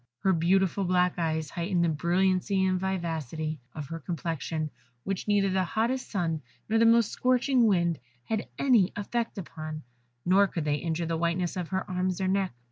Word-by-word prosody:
Her 190 - +4
beautiful 190 +3 +2
black 180 -1 +2
eyes 160 -3 -1
heightened 175 0 0
the 170 - +3
brilliancy 185 +4 +1
and 185 -1 +1
vivacity 160 -5 -3 0.2
of 150 -3 -5
her 165 - -5
complexion, 160 -1 -3 0.3
which 195 +1 -3
neither 200 -2 +3
the 190 0 +2
hottest 235 +7 -1
sun 165 -6 -1 0.3
nor 225 +1 +2
the 230 - +6
most 230 -2 +4
scorching 255 -1 +3
wind 170 -5 +2 0.2
had 220 - -2
any 230 -9 +4
effect 230 +3 -2
upon, 155 -4 -6 0.4
nor 195 +3 +5
could 165 -5 -4
they 145 -1 +1
injure 165 +1 -2
the 165 0 -1
whiteness 170 +1 0
of 180 -3 -3
her 190 +1 -2
arms 185 0 -1
or 190 - 0
neck. 190 0 +1
180 Hz, 175 wpm, -28 LUFS, 165-195 Hz, 0.4 s, the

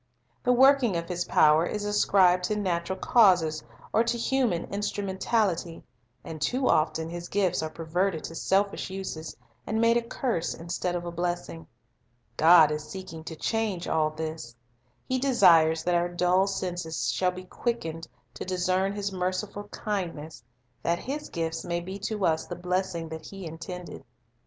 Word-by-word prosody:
The 250 - +2
working 255 -5 +5
of 170 0 -4
His 175 0 -2
power 155 +1 +5
is 205 +4 -3
ascribed 185 -3 +3
to 210 - -1
natural 185 -2 -1
causes 175 - +4 0.3
or 225 - +4
to 235 +1 0
human 235 -7 +1
instrumentality, 200 -3 -1 0.4
and 155 -2 -8
too 255 - 0
often 160 +1 +2
His 170 +1 -7
gifts 190 -4 +1
are 155 - -3
perverted 165 +2 -1
to - - -6
selfish 195 +4 0
uses, 185 -4 -6 0.3
and 220 - 0
made 230 +1 +4
a - - +1
curse 230 -6 -2
instead 175 +1 -3
of 175 0 -3
a 175 - -4
blessing. 175 -1 -4 0.7
God 160 -1 +7
is 150 0 -3
seeking 165 -2 -8
to 160 - -6
change 210 -1 -2
all 155 -1 +2
this. 155 -5 -6 0.5
He 260 0 0
desires 170 -11 +5
that 175 - +1
our 175 0 +2
dull 180 +2 +2
senses 175 -4 -2
shall 185 - +1
be 180 0 -7
quick 235 +5 -2
ened 165 0 -6 0.3
to - - -6
discern 185 +1 0
His 200 -1 -3
merciful 190 +2 -3
kindness, 170 - -5 0.4
that 170 0 +1
His 285 +9 -5
gifts 165 -1 -3
may 170 0 -2
be 190 +3 -7
to 205 -1 -2
us 160 -1 +1
the 175 - -5
blessing 180 -2 -2
that 160 0 -8
He 195 -2 -8
intended. 170 +2 -8
180 Hz, 160 wpm, -27 LUFS, 165-200 Hz, 0.7 s, God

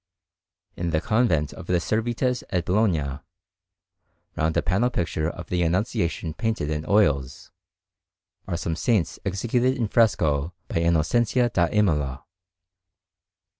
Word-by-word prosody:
In 85 0 -2
the 80 -1 +1
Convent 90 - +1
of - - -10
the 90 -1 +2
Servites 120 +6 -1
at 90 -2 -1
Bologna, 85 -9 +1 1.2
round 80 +1 0
a - - +2
panel 100 +9 +2
picture 85 -7 -1
of 85 -1 -9
the 90 -1 0
Annunciation 85 -2 -1
painted 110 -6 -2
in 75 0 -3
oils, 75 -11 +1 1.0
are 85 - -2
some 85 -1 -2
saints 100 0 0
executed 120 +7 0
in 115 -3 0
fresco 85 -8 +2
by - - -3
Innocenzio 100 - +2
da 85 -1 +3
Imola. 75 -10 0
90 Hz, 125 wpm, -24 LUFS, 80-110 Hz, 1.2 s, da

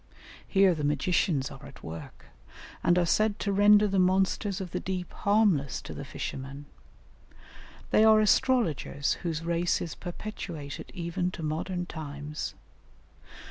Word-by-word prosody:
Here 195 -2 +4
the 155 -3 -4
magicians 145 -1 +1
are - - -11
at - - -13
work, 80 -1 -9 0.6
and 175 +1 +4
are 175 - +3
said 215 +4 +2
to 200 - -1
render 205 +1 +6
the 195 -1 +1
monsters 190 +2 +2
of 185 -3 -6
the 180 - -2
deep 185 -2 -4
harmless 200 -10 +2
to - - -7
the - - -6
fishermen; 135 +2 -6 1.3
they 215 - +5
are 220 -1 +7
astrologers 210 - +2
whose 165 -2 -3
race 170 +1 +1
is 165 - -4
perpetuated 175 -5 -7
even 175 +1 -2
to 180 -2 -7
modern 175 +4 -2
times. 150 -2 -6
175 Hz, 140 wpm, -28 LUFS, 150-195 Hz, 1.3 s, are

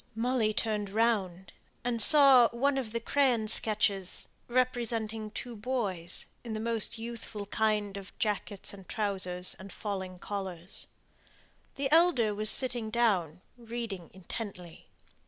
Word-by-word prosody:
Molly 230 -1 +1
turned 210 -2 -1
round, 195 -4 0 0.3
and 235 -1 0
saw 270 -2 +8
one 270 +4 0
of 235 -5 -5
the 230 - -1
crayon 245 -3 +2
sketches 210 -4 +2 0.2
representing 230 -3 -1
two 240 +2 -7
boys, 205 -7 -2 0.2
in 230 -2 -5
the 215 - -3
most 230 +1 -1
youthful 225 -2 -6
kind 210 -1 0
of 195 0 -10
jackets 205 -2 -2
and 195 -2 -13
trousers, 185 -4 0
and 190 +1 -10
falling 190 -3 -5
collars. 190 -2 -5 0.9
The 275 0 -2
elder 315 -10 +4
was 215 +1 +1
sitting 240 -4 +1
down, 190 -8 +1 0.2
reading 230 -7 -6
intently. 185 -2 -7
215 Hz, 125 wpm, -30 LUFS, 195-235 Hz, 0.9 s, saw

